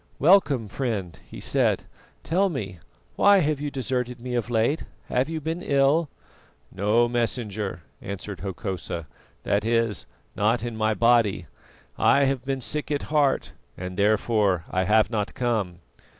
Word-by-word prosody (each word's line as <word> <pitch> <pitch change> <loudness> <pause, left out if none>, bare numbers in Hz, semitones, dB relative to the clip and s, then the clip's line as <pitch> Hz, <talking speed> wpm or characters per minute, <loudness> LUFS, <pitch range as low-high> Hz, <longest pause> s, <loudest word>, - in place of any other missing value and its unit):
"Welcome, 145 - +4
friend," 100 -6 -3
he - - -9
said. - - +1 0.4
"Tell 190 +4 +2
me, 100 - -5 0.4
why 200 0 +6
have 150 -2 0
you 145 - -2
deserted 125 -2 -3
me 125 +1 -5
of 120 -1 -1
late? 120 +7 +1 0.2
Have 130 +4 +1
you 160 -1 -3
been 160 +3 -3
ill?" 140 +1 +2 0.6
"No, 110 +5 +2
Messenger," 110 -6 -2 0.2
answered 100 0 -6
Hokosa, 95 -4 -4 0.4
"that 100 +1 +1
is, 115 -1 0 0.3
not 110 +4 +1
in 120 -1 -4
my 110 0 +1
body. 115 -5 +3 0.5
I 140 0 +5
have 135 -2 0
been 135 0 -2
sick 150 +4 -3
at 150 +1 -3
heart, 145 -3 +2 0.3
and 90 0 -6
therefore 105 -2 +2
I 95 0 +1
have 110 +3 +3
not 105 -2 -2
come." 105 -8 -1
115 Hz, 145 wpm, -25 LUFS, 100-135 Hz, 0.6 s, why